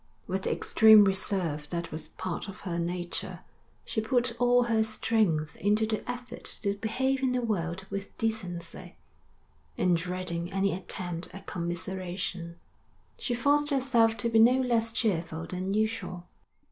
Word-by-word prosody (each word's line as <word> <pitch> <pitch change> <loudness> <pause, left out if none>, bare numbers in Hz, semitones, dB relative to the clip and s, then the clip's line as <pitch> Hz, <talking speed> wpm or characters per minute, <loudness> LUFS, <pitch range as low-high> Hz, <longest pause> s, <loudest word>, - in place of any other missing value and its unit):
With 190 +1 -2
the - - +1
extreme 220 -1 +7
reserve 185 -6 0
that 170 -1 -4
was 155 0 -4
part 185 +4 -5
of 195 - -9
her 175 -3 -3
nature, 175 +1 -3 0.4
she 220 - -1
put 245 +1 +1
all 245 0 +5
her 225 -2 +2
strength 215 -8 +1
into 210 +2 +2
the 220 -1 -1
effort 245 0 -6 0.2
to 200 -1 +1
behave 260 +6 -1
in 260 -1 +1
the 250 - +1
world 190 -4 -2
with 200 0 -5
decency; 215 -6 -3 0.8
and 180 -1 +3
dreading 175 0 -3
any 195 0 +1
attempt 180 -1 -4
at 195 0 -10
commiseration, 175 0 -4 0.6
she 245 - -1
forced 290 +4 +2
herself 245 -5 +3
to 235 +3 0
be 225 -1 +4
no 245 +4 +6
less 235 -3 +1
cheerful 170 -8 -1
than 185 +3 -3
usual. 215 -4 -1
200 Hz, 145 wpm, -29 LUFS, 175-225 Hz, 0.8 s, extreme